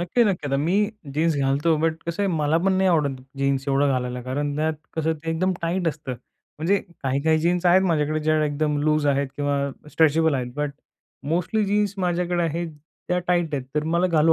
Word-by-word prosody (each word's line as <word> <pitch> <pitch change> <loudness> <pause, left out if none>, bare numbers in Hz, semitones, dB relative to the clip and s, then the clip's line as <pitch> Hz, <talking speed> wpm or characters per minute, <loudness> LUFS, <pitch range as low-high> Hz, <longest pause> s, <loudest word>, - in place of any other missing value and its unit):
नक्की-नक्की. 185 -3 +1
आता 135 0 0
मी 160 +7 0 0.4
जीन्स 160 +1 +2
घालतो 140 +4 +2
बट 160 0 -1
कसं 170 +4 -2
आहे 200 - +1
मला 155 +1 +2
पण 195 - +3
नाही 190 0 +3
आवडत 150 -6 +2 0.2
जीन्स 135 -1 +1
एवढं 140 +1 +3
घालायला, 125 -1 -2
कारण 145 +3 -2
त्यात 155 +1 0 0.2
कसं 160 0 +1
ते 165 +1 -5
एकदम 185 +3 +1
टाईट 170 +1 0
असतं. 150 -3 -5 0.5
म्हणजे 190 +6 +2 0.2
काही-काही 140 +4 +2
जीन्स 175 +2 +1
आहेत 180 +2 +6
माझ्याकडे 155 -4 +1
ज्या 155 0 +2
एकदम 150 0 0
लूज 155 -1 +2
आहेत 140 0 +2
किंवा 145 -1 0 0.3
स्ट्रेचेबल 160 0 +3
आहेत. 125 -2 -3
बट 150 -1 -1 0.6
मोस्टली 205 +5 +1
जीन्स 205 0 +1
माझ्याकडे 175 -1 0
आहे 170 +1 -1
त्या 160 +4 -5
टाईट 175 -4 +1
आहेत. 135 -2 -2
तर 150 0 0
मला 175 +2 +3
घालू 165 -2 +4
160 Hz, 190 wpm, -24 LUFS, 145-175 Hz, 0.6 s, आहेत